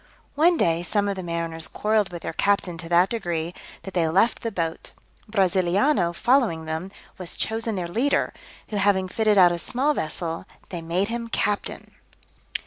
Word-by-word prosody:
One 335 Hz, +4 st, +4 dB
day 165 Hz, -, +2 dB
some 205 Hz, +4 st, 0 dB
of 200 Hz, -, -1 dB
the 190 Hz, -, -5 dB
mariners 170 Hz, -2 st, -2 dB
quarrelled 210 Hz, -3 st, 0 dB
with 170 Hz, -2 st, -7 dB
their -, -, -4 dB
captain 200 Hz, -1 st, +1 dB
to 165 Hz, -2 st, -7 dB
that 175 Hz, +2 st, +4 dB
degree, 175 Hz, -7 st, -2 dB, 0.3 s
that 195 Hz, -, -8 dB
they 170 Hz, -3 st, +2 dB
left 195 Hz, +9 st, +2 dB
the 230 Hz, -, -3 dB
boat. 165 Hz, -4 st, -3 dB, 0.4 s
Brasiliano 190 Hz, -, +2 dB
following 215 Hz, -5 st, +2 dB
them, 160 Hz, +4 st, -4 dB, 0.3 s
was 180 Hz, -2 st, -3 dB
chosen 225 Hz, 0 st, -1 dB
their 180 Hz, -2 st, -2 dB
leader, 240 Hz, +11 st, +1 dB, 0.4 s
who 210 Hz, -, -3 dB
having 195 Hz, -1 st, +2 dB
fitted 215 Hz, +2 st, +2 dB
out 180 Hz, -2 st, +7 dB
a 175 Hz, -, -2 dB
small 265 Hz, -, +1 dB
vessel, 165 Hz, -, -4 dB, 0.2 s
they 175 Hz, -3 st, -5 dB
made 175 Hz, +5 st, 0 dB
him 235 Hz, 0 st, -3 dB
captain. 210 Hz, -2 st, -2 dB
185 Hz, 170 wpm, -24 LUFS, 170-220 Hz, 0.4 s, out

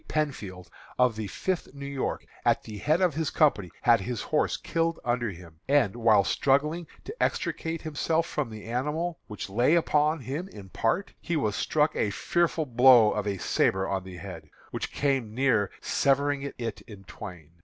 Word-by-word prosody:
Penfield, 105 Hz, -12 st, -3 dB, 0.3 s
of 125 Hz, -3 st, +3 dB
the 110 Hz, -1 st, -4 dB
Fifth 175 Hz, -, -3 dB
New 140 Hz, 0 st, -7 dB
York, 140 Hz, -1 st, -3 dB, 0.2 s
at -, -, +2 dB
the 105 Hz, -2 st, -8 dB
head 155 Hz, -, +2 dB
of 180 Hz, -4 st, +3 dB
his 155 Hz, 0 st, -1 dB
company, 105 Hz, -, +2 dB
had 115 Hz, -3 st, +5 dB
his 120 Hz, +2 st, -3 dB
horse 155 Hz, -, +1 dB
killed 165 Hz, 0 st, -1 dB
under 120 Hz, -1 st, 0 dB
him, 85 Hz, -3 st, -12 dB
and, 135 Hz, -8 st, +3 dB
while 110 Hz, -4 st, +4 dB
struggling 150 Hz, -, +1 dB, 0.2 s
to 430 Hz, -, -7 dB
extricate 165 Hz, 0 st, -1 dB
himself 160 Hz, +2 st, 0 dB
from 150 Hz, -6 st, -3 dB
the 110 Hz, -1 st, -9 dB
animal, 150 Hz, +9 st, -2 dB
which 105 Hz, -2 st, -6 dB
lay 120 Hz, -, +3 dB
upon 155 Hz, -2 st, +2 dB
him 145 Hz, +9 st, -4 dB
in 100 Hz, -2 st, -11 dB
part, 115 Hz, -, -1 dB
he 170 Hz, -, -2 dB
was 110 Hz, -9 st, 0 dB
struck 150 Hz, 0 st, +1 dB
a 105 Hz, -, +1 dB
fearful 165 Hz, +8 st, 0 dB
blow 125 Hz, -3 st, +6 dB
of 105 Hz, -1 st, -2 dB
a 100 Hz, -1 st, -1 dB
sabre 95 Hz, +4 st, +1 dB
on 95 Hz, -1 st, -2 dB
the 95 Hz, -1 st, -9 dB
head, 85 Hz, -5 st, -9 dB, 0.2 s
which -, -, -4 dB
came 135 Hz, -6 st, -1 dB
near 120 Hz, -7 st, +2 dB
severing 140 Hz, +1 st, +1 dB, 0.2 s
it 115 Hz, -2 st, -4 dB
in 105 Hz, -4 st, -11 dB
twain. 90 Hz, -5 st, -10 dB
125 Hz, 175 wpm, -27 LUFS, 105-150 Hz, 0.3 s, blow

